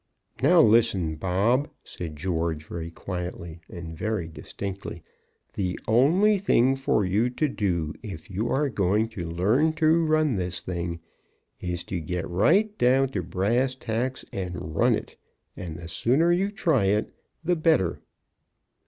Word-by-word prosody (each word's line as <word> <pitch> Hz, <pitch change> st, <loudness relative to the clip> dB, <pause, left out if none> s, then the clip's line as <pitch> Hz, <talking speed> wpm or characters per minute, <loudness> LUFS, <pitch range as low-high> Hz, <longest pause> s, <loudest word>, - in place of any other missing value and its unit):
"Now, 165 Hz, +5 st, +6 dB
listen, 105 Hz, -, +3 dB
Bob," 100 Hz, -, +1 dB
said 85 Hz, -4 st, -7 dB
George, 80 Hz, -1 st, -2 dB
very 85 Hz, 0 st, -6 dB
quietly 90 Hz, -2 st, -6 dB
and 85 Hz, -2 st, -7 dB
very 105 Hz, -1 st, -2 dB
distinctly, 95 Hz, +1 st, -7 dB, 0.5 s
"the 90 Hz, -2 st, -2 dB
only 175 Hz, -, +4 dB
thing 135 Hz, -9 st, +3 dB
for 135 Hz, -6 st, +1 dB
you 105 Hz, +7 st, +2 dB
to 150 Hz, +5 st, 0 dB
do 85 Hz, -, -1 dB
if 95 Hz, -8 st, -8 dB
you 105 Hz, +5 st, -2 dB
are 145 Hz, +4 st, +1 dB
going 105 Hz, -1 st, +1 dB
to 90 Hz, -7 st, -6 dB
learn 110 Hz, -, +2 dB
to 160 Hz, +1 st, +3 dB
run 155 Hz, -6 st, +2 dB
this 90 Hz, 0 st, -3 dB
thing, 85 Hz, -2 st, -4 dB, 0.6 s
is 90 Hz, -1 st, -3 dB
to 90 Hz, -, -4 dB
get 85 Hz, +2 st, -3 dB
right 185 Hz, -, +3 dB
down 130 Hz, +2 st, +4 dB
to 100 Hz, -8 st, -2 dB
brass 110 Hz, +10 st, 0 dB
tacks 125 Hz, +1 st, -3 dB
and 90 Hz, -4 st, -5 dB
run -, -, +4 dB
it, -, -, -7 dB, 0.4 s
and 85 Hz, -3 st, -6 dB
the 85 Hz, -1 st, -8 dB
sooner 135 Hz, -, +2 dB
you 190 Hz, +3 st, +2 dB
try 165 Hz, -, +1 dB
it, 105 Hz, +3 st, +1 dB, 0.3 s
the 175 Hz, +2 st, +2 dB
better." 155 Hz, -, +2 dB
100 Hz, 145 wpm, -26 LUFS, 85-135 Hz, 0.6 s, Now